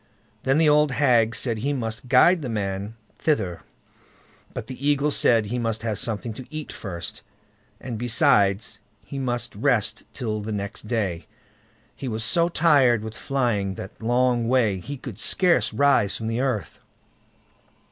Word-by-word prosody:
Then 135 Hz, +2 st, +3 dB
the 160 Hz, -1 st, +4 dB
old 150 Hz, -2 st, +4 dB
hag 120 Hz, -4 st, +3 dB
said 115 Hz, -1 st, -1 dB
he 140 Hz, +6 st, -1 dB
must 115 Hz, -2 st, -4 dB
guide 170 Hz, +7 st, +5 dB
the 130 Hz, -, -4 dB
man 100 Hz, 0 st, -3 dB, 0.2 s
thither; 100 Hz, -, 0 dB, 0.9 s
but -, -, -6 dB
the 135 Hz, +2 st, -3 dB
eagle 145 Hz, +1 st, +2 dB
said 115 Hz, -5 st, +4 dB
he 120 Hz, +4 st, -3 dB
must 115 Hz, -2 st, -2 dB
have 110 Hz, -3 st, -1 dB
something 115 Hz, +1 st, -3 dB
to 130 Hz, +3 st, -10 dB
eat 155 Hz, 0 st, -6 dB
first, 85 Hz, -4 st, -6 dB, 0.6 s
and 120 Hz, -4 st, -6 dB
besides 110 Hz, -4 st, +2 dB, 0.3 s
he 140 Hz, -, -6 dB
must 120 Hz, -4 st, -2 dB
rest 110 Hz, -3 st, +1 dB
till 110 Hz, -5 st, -3 dB
the 110 Hz, +1 st, -5 dB
next 100 Hz, 0 st, -5 dB
day; 100 Hz, -8 st, -2 dB, 0.7 s
he 135 Hz, -, -6 dB
was 110 Hz, -2 st, -2 dB
so 170 Hz, +8 st, +2 dB
tired 140 Hz, -10 st, +4 dB
with 110 Hz, 0 st, -7 dB
flying 115 Hz, -8 st, -1 dB
that 95 Hz, -, -9 dB
long 120 Hz, 0 st, +1 dB
way, 115 Hz, -6 st, +2 dB
he 140 Hz, +10 st, -7 dB
could 120 Hz, -5 st, -9 dB
scarce 180 Hz, +7 st, +3 dB
rise 140 Hz, -8 st, +2 dB
from 110 Hz, -, -6 dB
the 115 Hz, +2 st, -1 dB
earth. 125 Hz, -9 st, -2 dB
120 Hz, 155 wpm, -24 LUFS, 105-135 Hz, 0.9 s, guide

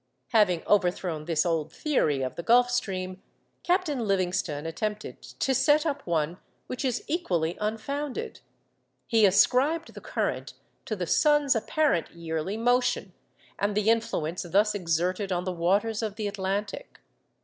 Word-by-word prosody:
Having 200 Hz, -7 st, +3 dB
overthrown 180 Hz, -5 st, +1 dB
this 165 Hz, -1 st, +1 dB
old 160 Hz, -3 st, -1 dB
theory 150 Hz, -, 0 dB
of 130 Hz, -, -3 dB
the -, -, -5 dB
Gulf 245 Hz, +6 st, +4 dB
Stream, 185 Hz, -5 st, -2 dB, 0.4 s
Captain 350 Hz, -6 st, +1 dB
Livingston 185 Hz, -7 st, -1 dB
attempted 210 Hz, +6 st, -4 dB
to 270 Hz, -, -2 dB
set 295 Hz, +4 st, +3 dB
up 285 Hz, -, -3 dB
one 165 Hz, +1 st, -1 dB, 0.3 s
which 255 Hz, -, -5 dB
is 250 Hz, -3 st, -1 dB
equally 175 Hz, -, -1 dB
unfounded. 255 Hz, +7 st, -3 dB, 0.7 s
He 225 Hz, -3 st, +4 dB
ascribed 265 Hz, -, +3 dB
the -, -, -10 dB
current -, -, -3 dB, 0.3 s
to -, -, -2 dB
the -, -, -3 dB
sun's 295 Hz, -3 st, +3 dB
apparent 225 Hz, -, +1 dB
yearly 165 Hz, +4 st, -3 dB
motion 245 Hz, -4 st, +1 dB, 0.5 s
and 200 Hz, 0 st, 0 dB
the 215 Hz, +1 st, +4 dB
influence 220 Hz, -8 st, -1 dB
thus 200 Hz, +5 st, +2 dB
exerted 180 Hz, +1 st, -1 dB
on 180 Hz, -1 st, 0 dB
the 185 Hz, 0 st, -3 dB
waters 200 Hz, +6 st, +1 dB
of 215 Hz, -2 st, -3 dB
the 210 Hz, -1 st, -3 dB
Atlantic. 200 Hz, +1 st, -4 dB
205 Hz, 140 wpm, -27 LUFS, 175-245 Hz, 0.7 s, Gulf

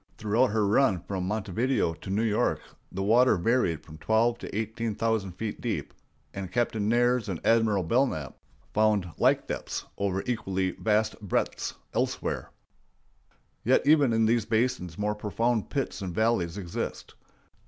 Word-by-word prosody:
Throughout 110 Hz, +4 st, +2 dB
her 105 Hz, 0 st, +1 dB
run 100 Hz, -, +3 dB
from 95 Hz, -2 st, -2 dB
Montevideo 105 Hz, 0 st, 0 dB
to 80 Hz, +5 st, -10 dB
New 100 Hz, +4 st, +1 dB
York 110 Hz, -2 st, +1 dB, 0.3 s
the 95 Hz, +1 st, -3 dB
water 115 Hz, +2 st, +5 dB
varied 85 Hz, -, +1 dB
from 80 Hz, -1 st, -12 dB
twelve 115 Hz, +5 st, +2 dB
to -, -, -6 dB
eighteen 110 Hz, 0 st, -2 dB
thousand 110 Hz, -5 st, -1 dB
feet 105 Hz, +4 st, -5 dB
deep, -, -, -3 dB, 0.4 s
and 95 Hz, -2 st, -6 dB
Captain 110 Hz, -1 st, 0 dB
Nares 120 Hz, -1 st, +2 dB
and 90 Hz, -4 st, -3 dB
Admiral 110 Hz, -4 st, +3 dB
Belknap 85 Hz, -, 0 dB, 0.4 s
found 105 Hz, -4 st, +2 dB
like -, -, +3 dB
depths -, -, -4 dB
over 95 Hz, -1 st, 0 dB
equally 95 Hz, -6 st, -1 dB
vast 110 Hz, 0 st, 0 dB
breadths 100 Hz, -, -2 dB, 0.2 s
elsewhere. -, -, -2 dB, 1.1 s
Yet -, -, +3 dB
even 145 Hz, -4 st, +5 dB
in 115 Hz, 0 st, +3 dB
these 115 Hz, -1 st, +2 dB
basins 110 Hz, -7 st, 0 dB
more 105 Hz, 0 st, 0 dB
profound 110 Hz, +2 st, -1 dB
pits 135 Hz, -6 st, -3 dB
and 90 Hz, -3 st, -4 dB
valleys 110 Hz, -6 st, +1 dB
exist. 90 Hz, -4 st, -5 dB
110 Hz, 145 wpm, -28 LUFS, 95-115 Hz, 1.1 s, water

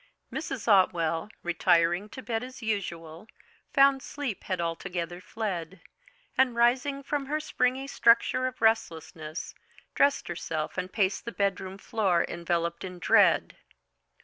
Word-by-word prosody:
Mrs. 270 Hz, -7 st, -4 dB
Otwell, 175 Hz, -4 st, +3 dB
retiring 175 Hz, +3 st, +2 dB
to -, -, -9 dB
bed 225 Hz, +1 st, -2 dB
as 255 Hz, -1 st, -9 dB
usual, 175 Hz, -4 st, -4 dB, 0.4 s
found 275 Hz, -1 st, +5 dB
sleep 275 Hz, -8 st, -5 dB
had 185 Hz, -2 st, -2 dB
altogether 170 Hz, +1 st, -3 dB
fled, 190 Hz, -5 st, -4 dB, 0.6 s
and 260 Hz, -2 st, +3 dB
rising 260 Hz, +4 st, +2 dB
from 280 Hz, -1 st, -2 dB
her 305 Hz, +2 st, -1 dB
springy 260 Hz, -3 st, 0 dB
structure 255 Hz, 0 st, +3 dB
of 250 Hz, -3 st, -7 dB
restlessness, 165 Hz, -7 st, -1 dB, 0.4 s
dressed 280 Hz, 0 st, +2 dB
herself 160 Hz, -2 st, -4 dB
and 185 Hz, 0 st, -3 dB
paced 195 Hz, -1 st, 0 dB
the 235 Hz, -, -4 dB
bedroom 195 Hz, -2 st, -2 dB
floor 195 Hz, -4 st, +1 dB
enveloped 170 Hz, 0 st, -2 dB
in 180 Hz, -1 st, -7 dB
dread. 175 Hz, -, +3 dB
200 Hz, 125 wpm, -28 LUFS, 170-250 Hz, 0.6 s, found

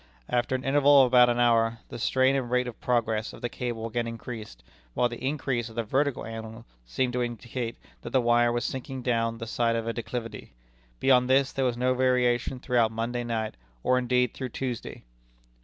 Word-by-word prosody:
After 120 Hz, +1 st, +1 dB
an 130 Hz, -, -3 dB
interval 140 Hz, 0 st, +6 dB
of -, -, +5 dB
about 125 Hz, -1 st, +6 dB
an 120 Hz, 0 st, 0 dB
hour, 115 Hz, -1 st, +3 dB
the -, -, -7 dB
strain 130 Hz, +3 st, +3 dB
and 130 Hz, -3 st, -1 dB
rate 125 Hz, 0 st, +2 dB
of 120 Hz, -, -8 dB
progress 115 Hz, -3 st, 0 dB
of -, -, -12 dB
the 120 Hz, -, -1 dB
cable 120 Hz, -2 st, -4 dB
again 115 Hz, +1 st, -2 dB
increased, 110 Hz, -, -8 dB, 0.3 s
while 120 Hz, -, +3 dB
the 120 Hz, +1 st, -8 dB
increase 130 Hz, -4 st, -1 dB
of 110 Hz, -, -14 dB
the 115 Hz, -, -1 dB
vertical 135 Hz, +4 st, 0 dB
angle 110 Hz, +1 st, -8 dB, 0.2 s
seemed 125 Hz, -, -1 dB
to 125 Hz, -, 0 dB
indicate 120 Hz, 0 st, -4 dB, 0.2 s
that -, -, -6 dB
the 130 Hz, -, +2 dB
wire 120 Hz, 0 st, +3 dB
was 120 Hz, 0 st, -1 dB
sinking 130 Hz, 0 st, -5 dB
down 115 Hz, -2 st, 0 dB
the 115 Hz, -, -6 dB
side 115 Hz, 0 st, 0 dB
of 115 Hz, -1 st, -2 dB
a 115 Hz, -, -2 dB
declivity. 115 Hz, -2 st, -6 dB, 0.5 s
Beyond 125 Hz, -1 st, +4 dB
this, 135 Hz, +1 st, +3 dB
there 135 Hz, -, -1 dB
was 120 Hz, -2 st, 0 dB
no 125 Hz, +1 st, +2 dB
variation 125 Hz, 0 st, +1 dB
throughout 120 Hz, -3 st, +2 dB
Monday 120 Hz, +2 st, -2 dB
night, 110 Hz, -2 st, -2 dB, 0.3 s
or, 125 Hz, 0 st, +3 dB
indeed, 125 Hz, -1 st, +1 dB
through 130 Hz, -2 st, -5 dB
Tuesday." 125 Hz, -1 st, -5 dB
120 Hz, 200 wpm, -27 LUFS, 115-125 Hz, 0.5 s, interval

